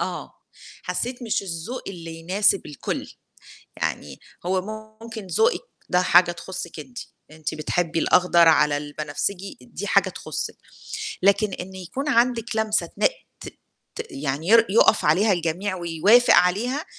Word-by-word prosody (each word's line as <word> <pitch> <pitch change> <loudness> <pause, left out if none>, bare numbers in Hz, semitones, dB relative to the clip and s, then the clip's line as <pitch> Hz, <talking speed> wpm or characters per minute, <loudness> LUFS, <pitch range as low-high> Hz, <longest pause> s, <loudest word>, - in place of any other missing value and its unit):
آه، - - -4 0.5
حسّيت 245 +1 -3
مش 225 -4 -1
الذوق 185 +6 -5
اللي 170 -4 -8
يناسب 195 +4 +1
الكل. 150 -3 -5 0.6
يعني 70 -2 -4 0.3
هو 185 +1 +1 0.4
ممكن 225 -3 -8
ذوقِك 450 - +2 0.3
ده 180 -1 +3
حاجة 175 -1 +5
تخُصِّك 175 0 -7
أنتِ، 250 -2 -11 0.3
أنتِ 155 0 -5
بتحبّي 165 +2 -1
الأخضر 170 0 +4
على 150 -2 +4
البنفسجي 150 +6 -4
دي 125 - -7
حاجة - - +3
تخُصِّك، - - -5 0.7
لكن 200 0 +3
إن 190 +1 -7
يكون 225 - -5
عندِك 240 -2 +1
لمسة 220 -1 +1
تنق - - +1 0.3
ت - - -9 0.5
ت 455 - -6
يعني 160 - -3
ير 230 +2 +6
يقف 215 +1 +4
عليها 190 +8 +4
الجميع 175 +3 -2
ويوافق 185 +8 +4
عليها، 240 - +2
185 Hz, 135 wpm, -23 LUFS, 165-225 Hz, 0.7 s, ير